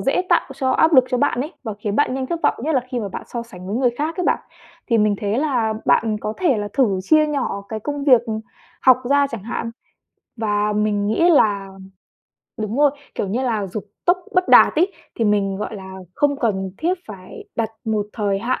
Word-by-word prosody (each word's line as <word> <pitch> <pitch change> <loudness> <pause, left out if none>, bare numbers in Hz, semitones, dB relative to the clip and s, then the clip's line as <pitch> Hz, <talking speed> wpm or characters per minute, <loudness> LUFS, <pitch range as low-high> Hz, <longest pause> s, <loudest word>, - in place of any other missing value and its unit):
dễ 270 +6 +1
tạo 345 - +5
cho 265 -1 0
áp 320 +5 +3
lực 260 -2 +7
cho 250 -1 0
bạn 270 -3 +1
ấy 300 +6 -4
và 220 -4 -5
khiến 210 0 -3
bạn 290 -3 +2
nhanh 265 0 -2
thất 335 +4 -3
vọng, - - +3
nhất 300 +5 -1
là 260 - +3
khi 250 -1 -3
mà 205 - -4
bạn - - -6
so 235 -1 -5
sánh 185 -6 -12
với 200 +4 -2
người 250 -1 +2
khác 300 +7 -3
ấy 360 - -1
bạn. - - +2 0.5
Thì 230 -3 +2
mình 210 -1 +3
thấy 205 +3 0
là 245 -7 0
bạn 220 -2 +2
có 215 - -3
thể 300 -11 +2
là 205 0 -3
thử 220 -9 +2
chia 310 +9 +4
nhỏ 270 -9 -2
cái 220 -1 -4
công 290 +3 -4
việc, 255 -5 +6
ừm, 220 -1 -3 0.4
học 255 -2 +6
ra 285 0 +4
chẳng 225 -5 -6
hạn 230 +1 -4 0.7
và 210 -1 0
mình 210 -1 0
nghĩ 275 +11 +3
là 200 -9 +3 0.9
đúng 215 +1 -3
rồi, 290 -1 +5 0.2
kiểu - - -2
như 240 +7 -1
là 220 -5 -1
dục 195 +3 -6 0.2
tốc 360 +1 +3 0.2
bất 365 0 +2
đạt - - +7
ấy, 365 +5 +2 0.2
thì 230 - -1
mình, 200 -2 +1
gọi 210 +2 -5
là, 190 -1 -9 0.2
không 285 -1 +1
cần 195 -6 -1
thiết 355 +3 0
phải 190 -4 -10
đặt 225 -1 -1
một 215 -2 -1
thời 200 -3 -1
hạn 235 +5 -1
230 Hz, 230 wpm, -21 LUFS, 210-280 Hz, 0.9 s, lực